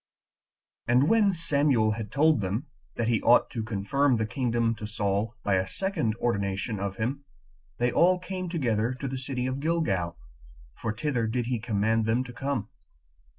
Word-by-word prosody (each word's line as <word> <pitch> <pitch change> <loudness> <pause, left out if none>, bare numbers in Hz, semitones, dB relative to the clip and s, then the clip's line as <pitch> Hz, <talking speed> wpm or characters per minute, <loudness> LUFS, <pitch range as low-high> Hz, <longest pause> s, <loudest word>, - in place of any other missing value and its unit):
4. 120 - +3
And 135 +4 +4
when 215 -3 +4
Samuel 140 - +2
had 105 -1 -5
told 150 -1 +3
them 100 +9 -2 0.3
that 115 - -1
he 115 -2 +2
ought 120 - +4
to 115 - -3
confirm 120 +6 +1
the 110 - 0
kingdom 115 -1 0
to 105 - -5
Saul 105 +2 -1
by 95 -2 +2
a 95 0 0
second 165 - -1
ordination 100 -2 -1
of 100 -1 -3
him, 130 +7 -2 0.5
they 120 0 +1
all 180 +6 +4
came 185 0 -5
together 120 - 0
to 135 +2 -5
the 130 0 -4
city 125 -1 -3
of 130 +1 -2
Gilgal, 100 - 0 0.6
for 115 - -3
thither 120 0 -1
did 120 +2 -1
he 120 -1 -1
command 110 0 +1
them 115 +3 +2
to 125 -2 -10
come. 130 -4 -3
120 Hz, 175 wpm, -27 LUFS, 110-140 Hz, 0.6 s, And